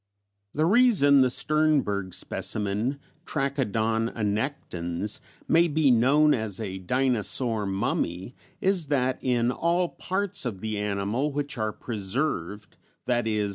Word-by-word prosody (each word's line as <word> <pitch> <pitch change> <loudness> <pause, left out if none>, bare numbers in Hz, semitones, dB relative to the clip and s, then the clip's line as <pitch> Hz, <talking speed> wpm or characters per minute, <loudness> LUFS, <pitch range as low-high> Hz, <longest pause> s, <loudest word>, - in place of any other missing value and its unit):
"The 155 +2 +2
reason 185 - +5
the 130 - +4
Sternberg 135 - +1
specimen 105 +6 -1 0.3
(Trachodon 115 -5 -1
annectens) 105 - -2 0.3
may 170 +1 +4
be 150 -3 +2
known 140 +6 +4
as 110 -3 -1
a 95 -4 -5
dinosaur 115 0 0
'mummy' 95 +1 -2 0.3
is 185 -5 +2
that 130 -3 0
in 120 -1 +1
all 170 +5 0
the - - -20
parts 195 +1 -1
of 115 -7 -4
the 110 -1 -3
animal 105 +7 -1
which 145 +1 -3
are 110 0 -1
preserved 105 - -4 0.3
(_i.e. 110 -4 0
120 Hz, 120 wpm, -26 LUFS, 105-145 Hz, 0.3 s, reason